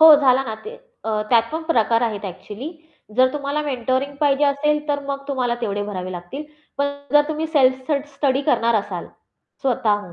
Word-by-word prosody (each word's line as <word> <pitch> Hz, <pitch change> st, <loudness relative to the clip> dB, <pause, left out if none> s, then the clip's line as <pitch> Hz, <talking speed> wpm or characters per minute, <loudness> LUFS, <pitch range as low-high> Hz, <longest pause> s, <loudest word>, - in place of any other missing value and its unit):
हो, 315 Hz, -1 st, +11 dB
झाला 265 Hz, -1 st, +4 dB
ना. 220 Hz, -, -4 dB
ते 455 Hz, +3 st, -7 dB, 0.3 s
अ, 215 Hz, -1 st, 0 dB
त्यात 230 Hz, -2 st, +6 dB
पण 320 Hz, +1 st, -2 dB
प्रकार 235 Hz, -7 st, +2 dB
आहेत 215 Hz, -3 st, -1 dB
एक्चुअली. 210 Hz, -, -6 dB, 0.5 s
जर 255 Hz, 0 st, +5 dB
तुम्हाला 290 Hz, +1 st, -2 dB
मेंटरिंग 260 Hz, 0 st, -1 dB
पाहिजे 290 Hz, -1 st, +3 dB
असेल, 300 Hz, +1 st, +1 dB
तर 285 Hz, -1 st, +1 dB
मग 275 Hz, 0 st, -2 dB
तुम्हाला 250 Hz, -3 st, 0 dB
तेवढे 205 Hz, -3 st, -1 dB
भरावे 185 Hz, -2 st, -4 dB
लागतील, 175 Hz, +13 st, -6 dB, 0.3 s
पण 280 Hz, -, +2 dB, 0.3 s
जर 295 Hz, -, +7 dB
तुम्ही 310 Hz, +1 st, -1 dB
सेल्फ 260 Hz, -3 st, +2 dB
स 280 Hz, -2 st, +2 dB
स्टडी 275 Hz, -1 st, +1 dB
करणार 235 Hz, -1 st, +3 dB
असाल 200 Hz, -4 st, -2 dB, 0.6 s
स्वतःहून, 210 Hz, -8 st, +1 dB
260 Hz, 180 wpm, -22 LUFS, 220-290 Hz, 0.6 s, हो